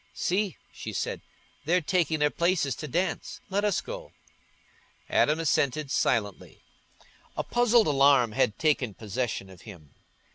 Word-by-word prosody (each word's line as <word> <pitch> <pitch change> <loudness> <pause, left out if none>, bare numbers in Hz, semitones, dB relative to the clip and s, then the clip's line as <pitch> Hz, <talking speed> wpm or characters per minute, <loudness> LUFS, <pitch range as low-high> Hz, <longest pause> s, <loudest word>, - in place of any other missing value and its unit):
"See," 190 0 -1 0.2
she - - -7
said, - - -3 0.4
"they're 175 +4 +3
taking 165 -1 0
their 150 -1 +2
places 170 -5 +1
to 155 - -6
dance; 175 +7 -2
let 200 +2 0
us 205 -3 +1
go." - - -8 1.0
Adam 150 +2 +3
assented 145 -2 0
silently. 105 -5 -1 0.7
A - - 0
puzzled 240 -1 +3
alarm 140 -5 +4
had 105 0 +1
taken 140 - +1
possession 110 -1 -3
of 95 -2 -15
him. 85 -10 -13
150 Hz, 135 wpm, -27 LUFS, 120-180 Hz, 1.0 s, alarm